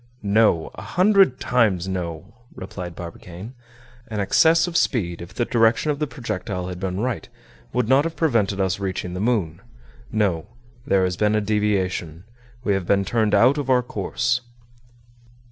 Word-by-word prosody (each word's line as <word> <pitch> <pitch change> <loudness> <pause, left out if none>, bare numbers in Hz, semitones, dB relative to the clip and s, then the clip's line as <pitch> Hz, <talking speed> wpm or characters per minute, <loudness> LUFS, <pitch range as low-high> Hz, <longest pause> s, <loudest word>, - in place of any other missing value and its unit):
"No! 100 -5 +2
a - - -9
hundred 190 -7 +3
times, 105 -8 +1
no!" 90 +1 -5 0.2
replied 90 -2 -7
Barbicane. 90 +5 -9 0.5
"An 110 -4 -4
excess 160 - +4
of 175 -1 -6
speed, 85 - 0
if 85 +1 -9
the 120 - -1
direction 115 +6 +2
of 145 - -4
the 150 - -1
projectile 100 - -4
had 90 -1 -6
been 95 0 -3
right, 125 0 -3 0.4
would 125 -2 0
not 135 +4 +4
have 165 -1 -3
prevented 115 -11 +1
us 95 0 0
reaching 95 -2 -3
the 90 - -4
moon. 100 -7 0 0.5
No, 100 -7 0 0.4
there 95 -7 +3
has 90 -1 -1
been 105 0 +2
a - - +3
deviation. 95 -6 -1 0.4
We 105 - +1
have 95 -3 -2
been 100 -1 +2
turned 110 0 +1
out 125 +8 +4
of 135 -2 -4
our 125 -1 +4
course." 115 +3 -1
105 Hz, 160 wpm, -23 LUFS, 90-125 Hz, 0.5 s, excess